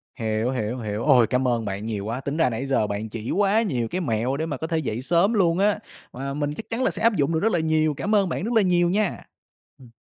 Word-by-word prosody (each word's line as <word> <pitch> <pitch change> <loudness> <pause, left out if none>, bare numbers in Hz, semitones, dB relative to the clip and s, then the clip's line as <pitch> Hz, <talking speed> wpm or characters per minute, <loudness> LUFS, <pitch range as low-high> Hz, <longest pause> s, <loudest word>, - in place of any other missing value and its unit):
Hiểu, 110 0 -1
hiểu, 120 -1 -2
hiểu. 110 -1 -4
Ôi, 125 -6 +5
cảm 125 +1 +1
ơn 115 -3 0
bạn 100 +2 -4
nhiều 105 -3 -3
quá, 120 +4 -3
tính 140 +3 -3
ra 160 -6 +3
nãy 120 +4 -3
giờ 130 -6 +1
bạn 105 +2 -4
chỉ 115 +1 -5
quá 205 +3 +3
nhiều 125 - -1
cái 185 +7 -3
mẹo 125 0 -1
để 160 - -2
mà 145 -4 -4
có 160 - -4
thể 165 - -1
dậy 125 -6 -2
sớm 175 - +2
luôn 180 -4 +2
á, 210 +1 +2 0.3
mà 135 +2 -4
mình 145 0 -2
chắc 220 - -9
chắn 235 +3 -1
là - - +2
sẽ - - -5
áp 230 -2 +4
dụng 145 +1 +1
được 160 - +1
rất 225 +4 +1
là 175 - +1
nhiều. 155 -1 +1
Cảm 210 +9 -1
ơn 195 -3 +3
bạn 175 - -3
rất 235 +2 -2
là 220 - +5
nhiều 175 -2 +2
nha. 205 0 -1 0.6
Ừm. 125 -3 -15
145 Hz, 280 wpm, -24 LUFS, 115-180 Hz, 0.6 s, Ôi